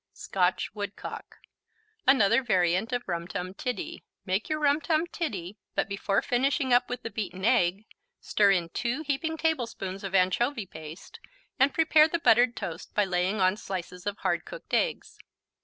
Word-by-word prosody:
Scotch 180 Hz, -1 st, 0 dB
Woodcock 205 Hz, -1 st, -7 dB, 0.7 s
Another 235 Hz, -3 st, +5 dB
variant 190 Hz, -1 st, +1 dB
of 245 Hz, -1 st, -2 dB
Rum 170 Hz, -1 st, -3 dB
Tum 185 Hz, +1 st, -5 dB
Tiddy. 310 Hz, -, -4 dB, 0.2 s
Make 190 Hz, -, -1 dB
your 310 Hz, -, 0 dB
Rum 295 Hz, 0 st, +2 dB
Tum 320 Hz, 0 st, +1 dB
Tiddy, 210 Hz, -, -5 dB, 0.2 s
but -, -, +1 dB
before 200 Hz, 0 st, 0 dB
finishing 260 Hz, +1 st, +1 dB
up 245 Hz, +1 st, +4 dB
with 245 Hz, 0 st, -4 dB
the 230 Hz, -, -5 dB
beaten 195 Hz, -3 st, -4 dB
egg, 210 Hz, -4 st, +2 dB, 0.3 s
stir 205 Hz, -1 st, +3 dB
in 175 Hz, -4 st, +2 dB
2 245 Hz, -, -2 dB
heaping 320 Hz, +3 st, -2 dB
tablespoons 230 Hz, -, -2 dB
of 195 Hz, 0 st, -3 dB
anchovy 205 Hz, +6 st, +2 dB
paste 160 Hz, -1 st, -11 dB, 0.4 s
and 270 Hz, +2 st, +5 dB
prepare 315 Hz, -1 st, +5 dB
the 340 Hz, -, -1 dB
buttered 245 Hz, -5 st, +4 dB
toast 165 Hz, -1 st, -6 dB
by 210 Hz, -, +3 dB
laying 185 Hz, +3 st, 0 dB
on 185 Hz, +1 st, +3 dB
slices 180 Hz, -2 st, -6 dB
of 205 Hz, 0 st, -2 dB
hard -, -, 0 dB
cooked -, -, -11 dB
eggs. -, -, 0 dB
215 Hz, 160 wpm, -28 LUFS, 185-270 Hz, 0.7 s, Another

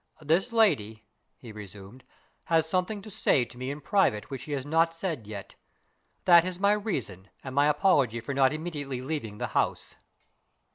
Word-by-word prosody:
"This 165 Hz, +10 st, +1 dB
lady," 110 Hz, -, +2 dB, 0.3 s
he 120 Hz, -, -11 dB
resumed, 105 Hz, +3 st, -11 dB, 0.4 s
"has 160 Hz, -1 st, +2 dB
something 185 Hz, +4 st, -1 dB
to 215 Hz, -, -10 dB
say 140 Hz, -, +2 dB
to 120 Hz, -, -14 dB
me 130 Hz, +2 st, -5 dB
in 145 Hz, +2 st, -5 dB
private 145 Hz, -, +1 dB
which 135 Hz, -3 st, -5 dB
she 150 Hz, -, -6 dB
has 135 Hz, -2 st, -3 dB
not 165 Hz, +2 st, +2 dB
said 165 Hz, -, -4 dB
yet. 100 Hz, -2 st, -8 dB, 0.7 s
That 170 Hz, -2 st, +8 dB
is 180 Hz, 0 st, -4 dB
my 200 Hz, +1 st, +4 dB
reason 130 Hz, -, -3 dB
and 130 Hz, -, -7 dB
my 145 Hz, +2 st, +4 dB
apology 145 Hz, -, +2 dB
for 120 Hz, +5 st, -5 dB
not 135 Hz, -1 st, +4 dB
immediately 145 Hz, -5 st, -5 dB
leaving 130 Hz, -8 st, -4 dB
the -, -, -3 dB
house." -, -, -1 dB
145 Hz, 175 wpm, -28 LUFS, 120-175 Hz, 0.7 s, That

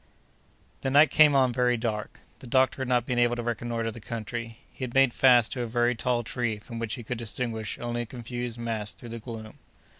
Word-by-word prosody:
The 135 Hz, -, -1 dB
night 145 Hz, +3 st, +6 dB
came 150 Hz, -2 st, +6 dB
on 130 Hz, -2 st, +4 dB
very 125 Hz, -1 st, +2 dB
dark. 110 Hz, -2 st, -4 dB, 0.2 s
The 130 Hz, -, -11 dB
doctor 130 Hz, +2 st, +2 dB
had 130 Hz, -, -2 dB
not 125 Hz, -2 st, +2 dB
been 125 Hz, -1 st, 0 dB
able 120 Hz, 0 st, +3 dB
to 120 Hz, -, -4 dB
reconnoitre 115 Hz, -1 st, -2 dB
the 115 Hz, -, -10 dB
country. 115 Hz, +1 st, -5 dB
He -, -, -8 dB
had 125 Hz, -1 st, -5 dB
made 135 Hz, -2 st, +5 dB
fast 125 Hz, -4 st, +5 dB
to 125 Hz, -, -3 dB
a 120 Hz, -, -2 dB
very 120 Hz, +1 st, +2 dB
tall 120 Hz, 0 st, 0 dB
tree, 115 Hz, -1 st, -2 dB
from 115 Hz, +2 st, -8 dB
which 115 Hz, -1 st, -2 dB
he 120 Hz, -, -8 dB
could 120 Hz, +1 st, -4 dB
distinguish 115 Hz, -1 st, -3 dB
only 120 Hz, 0 st, -3 dB
a -, -, -4 dB
confused 120 Hz, 0 st, -5 dB
mass 115 Hz, -3 st, -3 dB
through 120 Hz, -, -11 dB
the 115 Hz, 0 st, -6 dB
gloom. 110 Hz, -1 st, -9 dB
120 Hz, 220 wpm, -27 LUFS, 115-125 Hz, 0.2 s, night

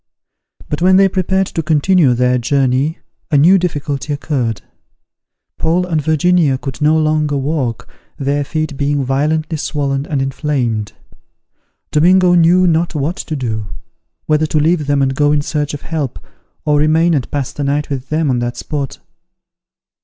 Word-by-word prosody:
But 150 Hz, -, -4 dB
when 185 Hz, +1 st, +5 dB
they 195 Hz, +1 st, +6 dB
prepared 190 Hz, 0 st, 0 dB
to 165 Hz, -, -3 dB
continue 155 Hz, -2 st, +3 dB
their 125 Hz, +1 st, +2 dB
journey, 135 Hz, +4 st, 0 dB, 0.3 s
a 150 Hz, -, +3 dB
new 180 Hz, +7 st, +5 dB
difficulty 145 Hz, -4 st, -3 dB
occurred; 130 Hz, -8 st, -2 dB, 1.0 s
Paul 170 Hz, +3 st, +1 dB
and 165 Hz, -4 st, -1 dB
Virginia 160 Hz, -1 st, +2 dB
could 135 Hz, +1 st, -7 dB
no 155 Hz, +1 st, +3 dB
longer 155 Hz, -2 st, +1 dB
walk, 135 Hz, -5 st, -2 dB, 0.3 s
their 140 Hz, +1 st, -1 dB
feet 155 Hz, 0 st, -3 dB
being 140 Hz, -1 st, 0 dB
violently 155 Hz, +4 st, 0 dB
swollen 140 Hz, -2 st, -2 dB
and 145 Hz, -, -1 dB
inflamed. 135 Hz, -6 st, -2 dB, 1.0 s
Domingo 180 Hz, +3 st, +4 dB
knew 175 Hz, +2 st, +4 dB
not 170 Hz, 0 st, +1 dB
what 150 Hz, +6 st, -2 dB
to 155 Hz, -, -5 dB
do; 110 Hz, -6 st, -3 dB, 0.6 s
whether 155 Hz, 0 st, +1 dB
to 155 Hz, -, 0 dB
leave 155 Hz, -1 st, +1 dB
them 140 Hz, -1 st, +2 dB
and 135 Hz, 0 st, 0 dB
go 145 Hz, +2 st, +2 dB
in 150 Hz, -1 st, +1 dB
search 150 Hz, -1 st, -2 dB
of 145 Hz, -, -10 dB
help, 155 Hz, -5 st, -3 dB, 0.5 s
or 150 Hz, -1 st, +2 dB
remain 160 Hz, +3 st, +3 dB
and 135 Hz, -5 st, -1 dB
pass 140 Hz, -3 st, -3 dB
the 145 Hz, -, -4 dB
night 145 Hz, +1 st, -1 dB
with 135 Hz, -1 st, -4 dB
them 155 Hz, -2 st, 0 dB
on 125 Hz, -, 0 dB
that 120 Hz, 0 st, -3 dB
spot. 140 Hz, -3 st, -4 dB
150 Hz, 160 wpm, -16 LUFS, 135-160 Hz, 1.0 s, they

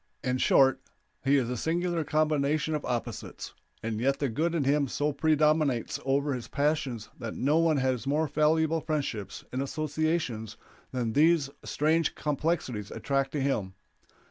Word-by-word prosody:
In 130 Hz, -1 st, 0 dB
short, 135 Hz, 0 st, +4 dB, 0.4 s
he 140 Hz, +1 st, +4 dB
is 130 Hz, -4 st, +1 dB
a 125 Hz, -, -2 dB
singular 170 Hz, +5 st, 0 dB
combination 155 Hz, +1 st, +1 dB
of 150 Hz, -, -2 dB
opposites, 120 Hz, -2 st, -4 dB, 0.3 s
and 110 Hz, -1 st, -2 dB
yet 135 Hz, +2 st, +2 dB
the 140 Hz, -1 st, -1 dB
good 165 Hz, +9 st, 0 dB
in 155 Hz, -, +1 dB
him 140 Hz, +1 st, +2 dB
so 145 Hz, +3 st, -1 dB
predominates 150 Hz, -4 st, +2 dB
over 140 Hz, +2 st, +1 dB
his 125 Hz, -2 st, -5 dB
passions 140 Hz, -6 st, -1 dB
that 115 Hz, -3 st, -5 dB
no 145 Hz, +5 st, +2 dB
one 165 Hz, -2 st, +3 dB
has 130 Hz, -1 st, 0 dB
more 150 Hz, +3 st, +2 dB
valuable 160 Hz, +2 st, +2 dB
friendships 140 Hz, -, -3 dB
and 130 Hz, -, -2 dB
associations 155 Hz, -6 st, -2 dB, 0.3 s
than 120 Hz, -3 st, -2 dB
these 155 Hz, -1 st, +4 dB
strange 160 Hz, +2 st, +1 dB
complexities 145 Hz, -, -2 dB
attract 135 Hz, -1 st, -1 dB
to 145 Hz, -, -1 dB
him. 105 Hz, -9 st, -1 dB
145 Hz, 150 wpm, -28 LUFS, 130-155 Hz, 0.4 s, short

